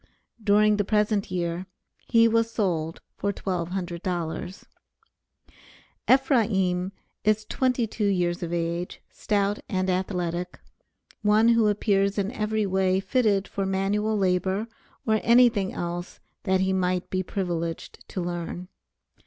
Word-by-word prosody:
During 210 0 +4
the 205 - +2
present 210 0 +1
year, 175 0 -2 0.4
he 230 -1 +5
was 230 0 +2
sold 170 -8 -1 0.2
for 200 - 0
$1200. 180 -1 -3 1.5
Ephraim 205 -9 +3 0.3
is 215 0 +2
twenty 250 -1 +1
two 215 -1 -2
years 175 -3 0
of 170 -1 -4
age, 170 +1 -2
stout 205 -1 0
and 185 -1 0
athletic, 180 -1 -2 0.6
one 215 +2 +4
who 230 -2 +4
appears 200 -1 +1
in 200 +1 0
every 215 -2 -1
way 190 -1 +2
fitted 205 -3 +1
for 195 - -3
manual 205 +3 0
labor 190 +2 +1 0.4
or 220 -1 +2
anything 235 -5 +4
else 175 0 -5 0.3
that 190 0 +2
he 190 0 +1
might 185 -1 0
be 185 - 0
privileged 175 -3 -4
to 185 - -3
learn. 175 +1 -4
195 Hz, 120 wpm, -26 LUFS, 180-210 Hz, 1.5 s, he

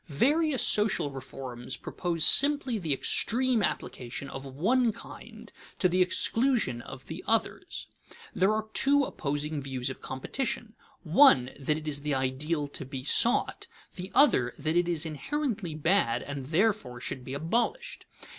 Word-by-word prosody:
_ - - -46
Various 285 - +2
social 210 -9 +1
reforms 130 -1 -7
propose 170 -3 -1
simply 280 -5 +5
the 165 -5 -3
extreme 240 - +1
application 130 -6 -4
of 135 +1 -7
one 225 - +1
kind - - -12 0.3
to 185 - +3
the 180 +1 +1
exclusion 220 - +1
of 135 +1 -11
the 165 +3 -8
others. 225 0 -1 0.5
There 190 +3 +2
are 215 0 -2
two 280 +1 +3
opposing 150 - -3
views 130 -1 -4
of - - -11
competition: 220 - -4 0.3
one, 155 - +5
that 150 +2 0
it 155 0 -8
is 145 -1 0
the 150 -1 -1
ideal 145 +4 -2
to - - -6
be 130 -1 -7
sought; 230 - +3 0.3
the 185 +1 -7
other, 125 - +4
that 155 +3 -2
it 175 0 +2
is 170 -2 -1
inherently 210 - -3
bad, 155 -7 +1
and 140 -2 -6
therefore 160 - 0
should 125 +1 -5
be 130 +2 -6
abolished. 240 - -2
160 Hz, 150 wpm, -28 LUFS, 135-225 Hz, 0.5 s, simply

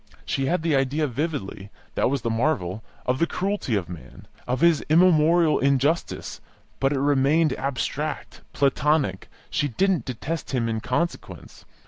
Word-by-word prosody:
She 135 0 -1
had 175 0 0
the 165 -3 +2
idea 135 +3 +1
vividly 120 - -4 0.2
(that - - +1
was 140 -1 -2
the 115 - 0
marvel) 115 - -1 0.2
of 125 +1 0
the 170 - +2
cruelty 195 - -2
of 95 -4 -1
man, 85 -3 -11 0.2
of 125 +3 -1
his 170 -3 +4
immemorial 165 -1 +4
injustice; 140 +4 0 0.4
but 135 0 +2
it 140 - 0
remained 145 +3 +3
abstract, 135 -2 -3
platonic; 140 -6 +1 0.2
she 145 - 0
didn't 185 - 0
detest 145 +6 -5
him 115 -2 0
in 110 -1 -1
consequence. 165 +10 -4
140 Hz, 145 wpm, -24 LUFS, 125-160 Hz, 0.4 s, his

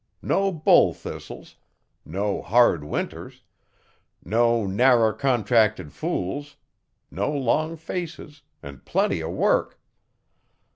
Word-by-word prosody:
No 195 0 +1
bull 160 -4 +4
thistles, - - -10 0.5
no 100 +5 -2
hard 115 -9 +3
winters, 75 - -6 0.8
no 115 +2 +2
narrer 115 +2 +3
contracted 110 - +1
fools; 145 +11 -4 0.6
no 100 - -2
long 150 +4 0
faces, 165 -2 -7 0.2
an' 70 -1 -10
plenty - - 0
o' - - -4
work. - - 0
120 Hz, 95 wpm, -24 LUFS, 100-145 Hz, 0.8 s, bull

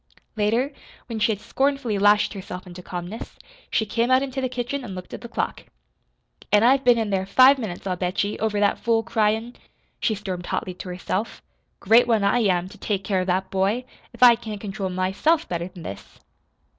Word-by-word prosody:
Later, 230 +7 +1 0.3
when 230 -3 -5
she 215 - +3
had 205 - -3
scornfully 250 -1 -1
lashed 205 +1 +4
herself 185 -2 -7
into 180 0 -10
calmness, 180 +5 -7 0.3
she 220 - +1
came 230 +3 0
out 260 +1 +4
into 265 -1 -3
the 255 - -1
kitchen 250 +2 -3
and 200 -6 -7
looked 180 0 -9
at - - -7
the 235 - -9
clock. - - -3 0.9
"An' 210 +1 +5
I've 265 +3 +4
been 245 -1 +5
in 220 -2 -1
there 190 -1 0
five 260 +6 +6
minutes, 195 -7 -5
I'll 185 -2 -1
bet 180 +2 -1
ye, 205 +1 -3
over 215 -1 0
that 205 -1 +2
fool 230 -1 +1
cry 225 -2 +2
in'," 225 +3 -3 0.4
she 220 - +1
stormed 185 -3 -5
hotly 185 - -2
to 180 +1 -9
herself. 185 +4 -4 0.4
"Great 230 +4 +5
one, 225 -4 +2
I 200 +5 +3
am, 185 -5 +1
to - - -15
take 200 -2 -2
care 190 -1 0
of 185 - -4
that 190 +1 0
boy, 200 +6 0 0.3
if - - -1
I 245 -1 +10
can't 220 -3 -7
control 195 -2 -4
myself 190 - +1
better 170 0 -3
than 180 -2 -12
this!" 100 - -9
210 Hz, 205 wpm, -24 LUFS, 190-235 Hz, 0.9 s, I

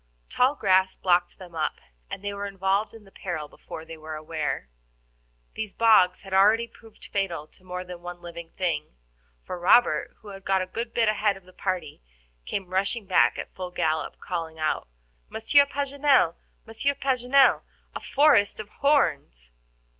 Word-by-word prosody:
Tall 260 +3 +3
grass 190 -3 +3
blocked 175 -1 +1
them 180 -2 -12
up, 160 -1 -1 0.3
and - - -6
they 205 0 -3
were 200 0 -4
involved 195 +2 0
in 225 -2 -13
the 195 - -19
peril 165 -7 -5
before 160 +2 -10
they 165 0 -9
were 155 0 -7
aware. 155 - -3 0.9
These 215 -2 -5
bogs 220 -6 +4
had 195 -1 -9
already 210 +4 +5
proved 225 -1 -17
fatal 180 -6 -1
to - - -23
more 180 0 -5
than 180 -1 -9
one 175 0 -8
living 170 -1 -9
thing, 160 - -2 0.5
for 180 - -5
Robert, 175 -3 +4
who 210 - -11
had 195 -1 -10
got 190 -1 +1
a - - -4
good 230 +5 -5
bit 230 -2 +3
ahead 210 -1 +1
of 195 - -16
the 185 0 -18
party, 180 - -3 0.5
came 190 -2 -4
rushing 200 +4 0
back 185 - +3
at - - -7
full 185 -1 -6
gallop, 160 -3 -1
calling 165 -2 -5
out: 155 -1 -1 0.4
"Monsieur 280 +6 +4
Paganel, 280 - +2 0.3
Monsieur 230 +5 -1
Paganel, 265 0 +3 0.3
a - - -5
forest 280 -10 +3
of 215 -1 -7
horns." 140 - 0
190 Hz, 170 wpm, -26 LUFS, 175-225 Hz, 0.9 s, already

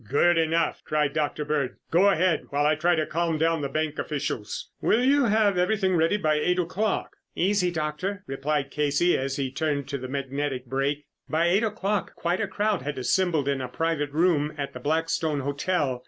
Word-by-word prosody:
"Good 175 +5 +4
enough!" 165 +1 +1
cried 150 -2 0
Dr. 150 -1 -1
Bird. 145 -4 -1 0.2
"Go 185 +5 +5
ahead 185 -2 +2
while 145 +1 0
I 150 - +4
try 170 +3 +2
to 155 -1 0
calm 165 0 -1
down 165 0 +1
the 140 - -2
bank 155 0 -2
officials. 115 -8 -4
Will 235 +3 +3
you 280 +1 +4
have 205 -4 +3
everything 190 0 +2
ready 165 +5 +2
by 155 -5 +1
eight 180 +4 +1
o'clock?" 185 +4 -1 0.2
"Easy, 190 0 +2
Doctor," 175 +5 -3
replied 135 +1 -2
Casey 150 +4 +2
as 135 0 -2
he 135 -2 -2
turned 145 -1 -1
to 140 -1 -3
the 130 - -6
magnetic 140 -1 -3
brake. 135 +3 -1 0.2
By 165 +2 +2
eight 195 +5 +3
o'clock 205 -2 -2
quite 175 +4 -1
a 210 - 0
crowd 205 0 0
had 145 +2 -4
assembled 160 +2 +1
in 140 -1 0
a 130 - -3
private 155 +2 -1
room 155 -1 +1
at 140 -1 -4
the 125 - -7
Blackstone 155 +1 0
Hotel. 140 -1 -1
155 Hz, 190 wpm, -26 LUFS, 140-180 Hz, 0.2 s, Go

